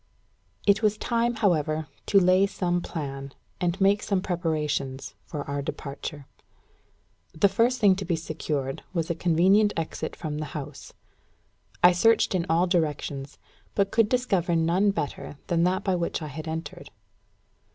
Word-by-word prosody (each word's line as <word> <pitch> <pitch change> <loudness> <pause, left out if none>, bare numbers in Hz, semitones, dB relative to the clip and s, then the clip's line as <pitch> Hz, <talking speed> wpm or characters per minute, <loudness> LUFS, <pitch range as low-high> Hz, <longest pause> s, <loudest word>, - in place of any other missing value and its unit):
It 205 +2 +4
was 215 -1 +2
time, 235 +1 0
however, 160 -7 +1 0.2
to 200 - +5
lay 185 +1 +4
some 175 -3 -1
plan, 140 -5 -6 0.3
and 175 +2 -1
make 200 +1 +4
some 200 -2 0
preparations, 155 -7 -2
for 145 -3 -5
our 140 0 -2
departure. 140 +1 -6 1.1
The 160 +5 +5
first 230 +6 +2
thing 200 -4 +5
to 195 - -4
be 175 -1 0
secured 150 -4 -3
was 165 -1 0
a - - +2
convenient 185 +5 +3
exit 160 -1 -4
from 150 -3 -4
the 155 - -3
house. 140 - -8 0.9
I 180 - +9
searched 225 +5 +3
in 180 -2 0
all 165 +2 +3
directions, 150 -5 -2 0.4
but 200 -1 +1
could 225 -2 +3
discover 195 -9 +1
none 170 +5 +3
better 145 -5 -4
than 170 0 +2
that 185 +2 0
by 190 - +1
which 170 -1 -2
I 155 - -5
had 155 +3 -7
entered. 160 +1 -6
170 Hz, 150 wpm, -26 LUFS, 155-195 Hz, 1.1 s, I